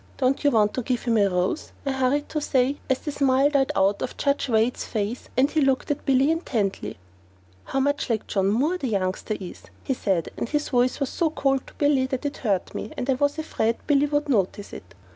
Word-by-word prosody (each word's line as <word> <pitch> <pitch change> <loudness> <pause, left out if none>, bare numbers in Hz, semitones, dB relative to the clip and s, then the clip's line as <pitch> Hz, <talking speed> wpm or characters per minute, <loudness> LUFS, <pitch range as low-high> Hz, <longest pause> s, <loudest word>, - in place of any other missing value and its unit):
Don't 265 0 +1
you 290 - +5
want 215 -5 +3
to 255 - -2
give 245 +1 -2
him 235 -2 +1
a 200 - +4
rose?" 180 - -1
I 275 - 0
hurried 265 +2 +1
to 305 - -2
say, 270 0 +1
as 265 - +3
the 295 - -5
smile 275 0 +3
died 275 -2 +2
out 195 +1 +2
of - - -4
Judge 280 -1 0
Wade's 225 +2 +1
face 215 +2 -3
and 270 +3 +3
he 315 - +1
looked 270 +1 +1
at 290 - -4
Billy 270 +2 +4
intently. 205 - -2 0.7
"How 270 - -1 0.3
like 220 -2 0
John 195 -1 0
Moore 285 - +1
the 270 - -2
youngster 195 0 -1
is!" 185 -3 -9 0.2
he 265 - 0
said, 190 -9 -1
and - - -3
his 295 0 -1
voice 250 +1 +2
was 275 -2 -1
so 335 -2 0
cold 270 -3 0
to - - -15
Billy 285 -3 +2
that 260 +2 -4
it 285 - -3
hurt 200 -7 -1
me, 215 - -5
and 245 - -3
I - - +4
was 285 +3 0
afraid 230 -7 -1
Billy 290 -1 +3
would 290 +1 0
notice 205 -5 0
it. 95 +2 -11
260 Hz, 220 wpm, -24 LUFS, 215-285 Hz, 0.7 s, you